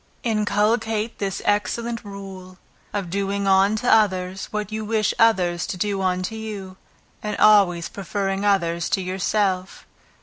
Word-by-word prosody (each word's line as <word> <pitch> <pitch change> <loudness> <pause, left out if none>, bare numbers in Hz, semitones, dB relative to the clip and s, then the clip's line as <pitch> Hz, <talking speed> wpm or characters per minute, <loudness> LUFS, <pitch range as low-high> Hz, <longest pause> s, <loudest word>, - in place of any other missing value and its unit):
Inculcate 220 0 0
this 195 -2 -3
excellent 230 +3 -1
rule, 195 -2 -9 0.3
"of 195 -5 -4
doing 200 +1 -1
unto 195 +4 +3
others, 190 -4 +2
what 210 -1 -4
you 220 0 -3
wish 215 -1 +1
others 180 -7 +3
to - - -4
do 200 +1 -1
unto 185 +2 -1
you," 205 -4 -7 0.4
and 210 0 -3
always 195 -5 +5
preferring 195 0 -3
others 170 -5 +1
to 195 - +1
yourself. 190 0 -1
200 Hz, 130 wpm, -23 LUFS, 185-215 Hz, 0.4 s, always